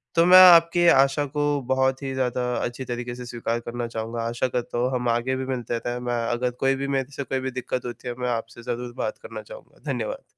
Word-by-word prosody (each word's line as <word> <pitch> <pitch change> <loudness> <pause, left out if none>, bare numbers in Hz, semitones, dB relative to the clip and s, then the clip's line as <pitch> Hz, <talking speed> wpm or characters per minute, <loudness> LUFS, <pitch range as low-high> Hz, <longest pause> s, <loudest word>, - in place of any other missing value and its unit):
तो 165 0 +5
मैं 185 +1 +8
आपके 170 +1 +5
आशा 135 +1 +4
को 145 0 -1
बहुत 130 0 +1
ही 135 -1 -3
ज़्यादा 125 -1 -1 0.2
अच्छी 120 +2 -4
तरीके 120 0 -5
से 125 0 -8
स्वीकार 120 -1 -3
करना 120 0 -5
चाहूँगा, 115 +1 -4
आशा 115 +2 -1
करता 120 -1 -3
हूँ 125 +2 +1
हम 125 -1 -1
आगे 120 +3 0
भी 130 0 -3
मिलते 120 -3 -3
रहें, 120 +1 -4
मैं 120 -1 -2
अगर 125 +1 0
कोई 135 0 +3
भी 140 +1 -3
मेरे 135 0 -1
से 140 - -3
कोई 135 0 -2
भी 130 0 -3
दिक्कत 125 0 -4
होती 120 +1 -7
है 120 - -2
मैं 125 0 -1
आपसे 115 0 -4
ज़रूर 120 0 -4
बात - - -3
करना 485 - -7
चाहूँगा, - - -14
धन्यवाद। - - -4
125 Hz, 230 wpm, -24 LUFS, 120-135 Hz, 0.2 s, मैं